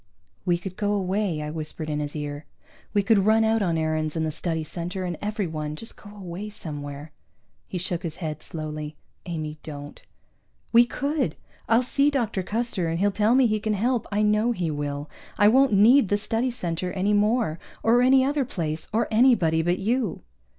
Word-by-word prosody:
"We 175 -2 +2
could 180 +1 -8
go 205 0 0
away," 190 -4 -1
I 150 - -4
whispered 155 0 -4
in 150 -1 -2
his 145 0 -4
ear. 145 0 -5 0.4
"We 205 -2 +2
could 200 -1 +3
run 220 +1 +5
out 220 0 +2
on 170 -4 +1
Aarons 155 -1 -1
and 160 -1 0
the 155 - -1
Study 160 0 -2
Center 175 +4 -5
and 175 -1 -2
everyone, 160 -8 -3
just 225 +8 -6
go 205 - -13
away 200 0 -7
somewhere." 145 -5 -7 0.6
He 185 - -4
shook 175 -1 -2
his 165 -3 -5
head 155 -4 -5
slowly. 155 -1 -6 0.3
"Amy, 155 -3 -4
don't." 145 -1 -9 0.7
"We 235 +1 +7
could! 280 - -1 0.3
I'll 230 +2 +5
see 275 +3 +2
Dr. 235 -8 -1
Custer, 210 -2 -2
and 165 0 -1
he'll 200 +2 +3
tell 215 +4 +3
me 265 -1 +5
he 215 -2 +1
can 215 0 -1
help, 240 +3 0
I 205 +1 +1
know 210 +3 +3
he 175 -7 -2
will. 145 0 -3 0.3
I 205 - +6
won't 260 +2 +5
need 220 +3 +6
the 205 - +3
Study 225 +4 0
Center 180 -6 -3
any 195 +2 +1
more, 210 -5 +2 0.2
or 235 +2 +5
any 260 +1 +5
other 285 0 +1
place, 160 -9 -4
or 225 +2 +1
anybody 215 -9 +4
but 175 +2 +1
you." 225 0 -1
190 Hz, 190 wpm, -25 LUFS, 160-225 Hz, 0.7 s, We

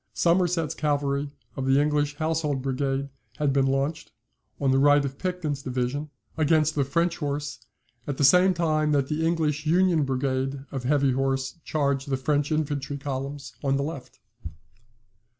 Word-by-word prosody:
Somerset's 170 -2 +2
cavalry 145 -1 -1 0.3
of 135 -1 -3
the 135 +1 +4
English 145 0 +1
Household 155 -3 -1
Brigade 135 +1 -1 0.3
had 145 -3 +1
been 135 -1 +3
launched, 135 +3 -1 0.5
on 135 -1 +2
the 135 - +3
right 145 0 +5
of 135 0 -6
Picton's 180 -7 -2
division, 130 +3 -2 0.3
against 155 0 +3
the 145 - +1
French 170 +5 0
horse, 145 -3 -3 0.5
at 140 -2 -3
the - - +1
same 180 +6 +6
time 155 -3 +1
that 140 -2 +1
the 155 +1 -1
English 155 -2 0
Union 175 -1 +3
Brigade 135 0 -2
of 135 -3 -4
heavy 140 0 +3
horse 135 +3 -1
charged 140 -2 -1
the 135 - +1
French 145 +2 0
infantry 145 -2 -1
columns 140 0 -5
on 135 -1 +2
the 140 - 0
left. 140 -3 -7
145 Hz, 155 wpm, -26 LUFS, 135-155 Hz, 0.5 s, same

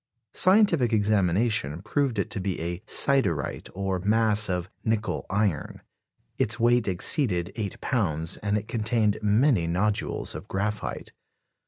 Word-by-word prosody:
Scientific 185 - +3
examination 105 - +1
proved 130 +2 -1
it 100 - -2
to - - -3
be 95 -1 -3
a 85 +1 -4
"siderite," 100 - 0
or 95 -1 -2
mass 105 +1 +2
of 90 -1 -2 0.2
"nickel 110 0 -2
iron"; 100 -6 -1 0.6
its 110 +3 +1
weight 120 0 +3
exceeded 95 - +2
eight 105 -3 -5
pounds, 80 - -1
and 105 0 -1
it 105 +1 -5
contained 110 -2 0
many 105 - +2
nodules 100 +5 -1
of - - -8
graphite. 105 +2 -3
105 Hz, 130 wpm, -26 LUFS, 95-115 Hz, 0.6 s, Scientific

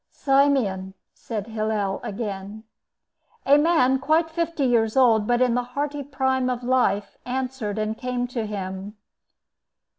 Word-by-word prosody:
"Simeon," 260 -10 +1 0.2
said 215 -4 -5
Hillel 215 -3 -2
again. 205 0 -5 0.8
A 285 +2 +6
man, 280 -5 +3
quite 315 +3 +1
fifty 335 -3 -1
years 230 -2 +2
old, 225 -5 +4
but 245 +1 +3
in 250 -2 +2
the 245 - +1 0.2
hearty 290 0 -1
prime 265 -2 0
of 250 -1 -3
life, 240 -5 +1
answered 250 -4 -3
and 215 0 -1
came 250 +1 -2
to 230 -3 -3
him. 195 0 -6
245 Hz, 130 wpm, -24 LUFS, 210-265 Hz, 0.8 s, A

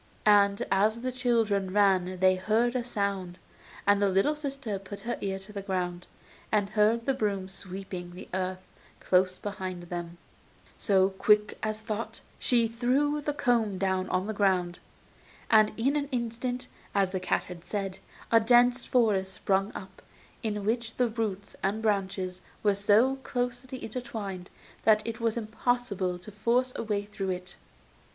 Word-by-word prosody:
And 200 -1 +5
as 215 +4 +3
the 255 +1 -2
children 225 -6 +1
ran 185 -2 +3
they 185 0 +5
heard 220 +6 +1
a 250 - 0
sound, 200 -6 -2 0.5
and 205 0 +4
the 200 - +4
little 195 +11 +3
sister 275 -8 -4
put 200 +1 -9
her 240 +3 -2
ear 195 -1 -1
to 195 +2 -10
the 200 - -4
ground, 180 -2 -3 0.4
and 205 -2 +1
heard 220 +2 +3
the 270 - +2
broom 200 -6 -1
sweeping 190 -1 -7
the 180 - -9
earth 185 0 -2 0.4
close 185 0 +2
behind 185 -3 -5
them; 175 0 -6 0.6
so, 195 -2 +3
quick 210 +2 +3
as 215 0 -3
thought, 220 0 -4 0.2
she 235 -2 +3
threw 260 +6 +1
the 295 - -1
comb 230 -7 +1
down 190 -1 0
on 185 +1 0
the 220 - -3
ground, 185 -4 +1 0.7
and 215 -1 +6
in 265 +6 +2
an 285 -1 -1
instant, 245 +1 -2 0.3
as 195 -2 +2
the 185 - -1
cat 185 - 0
had 175 -2 -10
said, 195 -2 -3 0.3
a 230 - +7
dense 245 +2 +4
forest 205 -6 +2
sprung 195 +2 0
up, 190 -1 -9 0.4
in 210 -2 -2
which 225 +1 -1
the 245 -2 +2
roots 210 -3 -3
and 210 +3 -1
branches 190 -3 -1 0.2
were 205 -1 +4
so 210 +7 +3
closely 250 0 -4
intertwined, 215 -6 -5 0.3
that 215 -1 +4
it 230 0 -4
was 230 0 0
impossible 220 -4 -1
to 185 +4 -11
force 240 +5 +1
a - - -2
way 210 -2 -1
through 195 -2 -4
it. 180 0 -4
205 Hz, 160 wpm, -29 LUFS, 190-235 Hz, 0.7 s, a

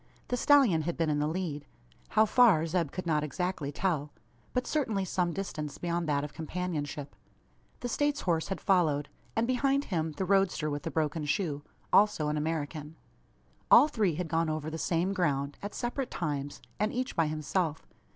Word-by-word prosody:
The 250 - +1
stallion 245 - +5
had 170 +2 -3
been 165 -2 +1
in 145 - +1
the 150 - +1
lead, 155 -4 -3 0.4
how 215 0 +4
far 215 -8 +5
Zeb 165 -2 0
could 185 - -5
not 155 -3 +1
exactly 155 0 -2
tell; 150 -3 -1 0.4
but 250 0 -1
certainly 220 -11 0
some 175 -1 0
distance 155 -6 -4
beyond 170 -2 -2
that 145 -1 +1
of 150 - -6
companionship. 155 -4 -4 0.7
The 245 - -2
States 290 +4 0
horse 165 -3 0
had 195 - -3
followed; 155 -7 +2 0.3
and 225 - +2
behind 275 +3 +1
him, 160 -2 0
the 190 - -2
roadster 190 -5 +2
with 145 0 -3
the - - -4
broken 155 -1 -1
shoe 150 -2 -1 0.3
also 205 -8 +4
an 150 - -1
American. 150 0 -3 0.7
All - - +8
three 210 - +1
had 175 +1 -3
gone 165 0 +1
over 155 0 -3
the 160 - -5
same 175 +4 0
ground, 145 -6 -1
at 205 - -6
separate 245 +2 -2
times, 145 -4 -3 0.2
and 210 +1 +1
each 255 +2 -3
by 165 -2 +2
himself. 155 +1 -1
165 Hz, 180 wpm, -30 LUFS, 150-195 Hz, 0.7 s, All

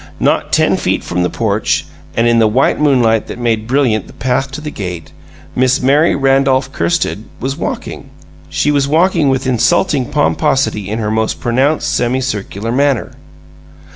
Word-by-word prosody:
Not - - +1
ten - - +3
feet - - -1
from 90 - -2
the 90 - +1
porch - - -1 0.3
and 115 +1 +3
in 115 0 +3
the 110 - +4
white 125 +5 +1
moonlight 120 -7 +2
that - - -7
made 115 -2 -1
brilliant 125 -6 +1
the - - -14
path 130 +2 -1
to 135 - -5
the 150 0 -6
gate 90 - -6 0.4
Miss 130 +1 +2
Mary 145 +6 +3
Randolph 135 -1 +2
Kirsted 165 -10 -1 0.2
was 135 +2 -3
walking. - - -5 0.4
She 110 - 0
was 140 -1 +1
walking 165 0 +2
with 135 0 0
insulting 130 - +1
pomposity 135 -8 0
in 110 - -2
her 110 -2 -2
most 110 0 -1
pronounced 135 +6 0
semicircular 120 -4 -2
manner. 135 -1 +1
130 Hz, 160 wpm, -15 LUFS, 110-140 Hz, 0.4 s, the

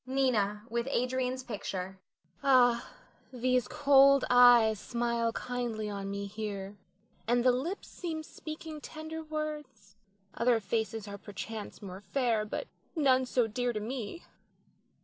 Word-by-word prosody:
Nina 220 -6 +1
[with 235 +2 -2
Adrian's 255 0 -1
picture]. 190 -5 -5 0.4
Ah, 245 -3 +4 0.4
these 250 -2 +1
cold 275 -1 +5
eyes 240 -3 +7
smile 235 0 -1
kindly 230 -4 -3
on 200 -1 -4
me 200 0 -3
here, 200 -1 -5 0.5
and 240 +1 +3
the 255 - +6
lips 300 +11 -3
seem 320 -3 -5
speaking 310 0 -8
tender 315 +1 -7
words. 300 -10 -6 0.4
Other 235 -1 +2
faces 220 +1 -2
are 200 0 -7
perchance 210 +2 -7
more 190 0 -8
fair, 225 0 0
but 355 - -4 0.3
none 260 -4 +3
so 245 -1 +2
dear 245 +2 -1
to 215 - -2
me. 240 +7 -5
240 Hz, 130 wpm, -31 LUFS, 215-265 Hz, 0.5 s, eyes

